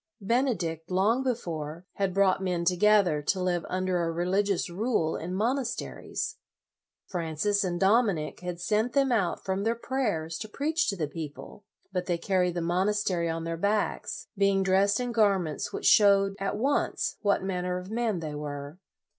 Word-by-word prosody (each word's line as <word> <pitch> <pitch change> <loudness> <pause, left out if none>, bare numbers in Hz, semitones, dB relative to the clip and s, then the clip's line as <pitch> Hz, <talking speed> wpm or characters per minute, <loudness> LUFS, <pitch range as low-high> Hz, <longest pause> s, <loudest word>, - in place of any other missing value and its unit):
Bene 240 +5 +1
dict, 165 -1 -4
long 200 +7 +2
before, 170 - -3
had 195 -1 +1
brought 190 0 +3
men 180 -2 -1
to 180 +1 +3
gether 195 -5 +4
to 185 +6 0
live 180 -2 0
under 185 -1 0
a 165 -1 0
religious 190 +3 0
rule 175 -3 0
in 170 +3 -5
monasteries. 245 +4 -2 0.7
Francis 175 +4 -1
and 175 -2 -2
Dominic 195 -6 +2
had 180 -1 -5
sent 215 +6 0
them 275 -2 +3
out 200 -7 0
from 190 0 -1
their 225 +2 +1
prayers 210 -11 -2
to 215 - -6
preach 315 +7 0
to 200 - -1
the 160 -5 -2
people, 155 +6 -8 0.3
but 180 -1 -2
they 175 -2 +1
carried 180 -1 +1
the 175 - -1
monas 190 +5 +1
tery 170 -3 0
on 165 0 -3
their 165 0 -3
backs, 205 +4 -1
being 195 -1 +3
dressed 195 +3 +3
in 245 -1 -2
gar 210 -4 +4
ments 165 +2 -4
which - - -5
showed 200 -2 +5
at 195 +1 -2
once 275 +6 0
what 200 -3 +2
man 185 -2 -2
ner 180 0 -1
of 180 +2 -8
men 225 -6 -1
they 155 -2 -4
were. 145 +2 -6
190 Hz, 180 wpm, -28 LUFS, 170-210 Hz, 0.7 s, showed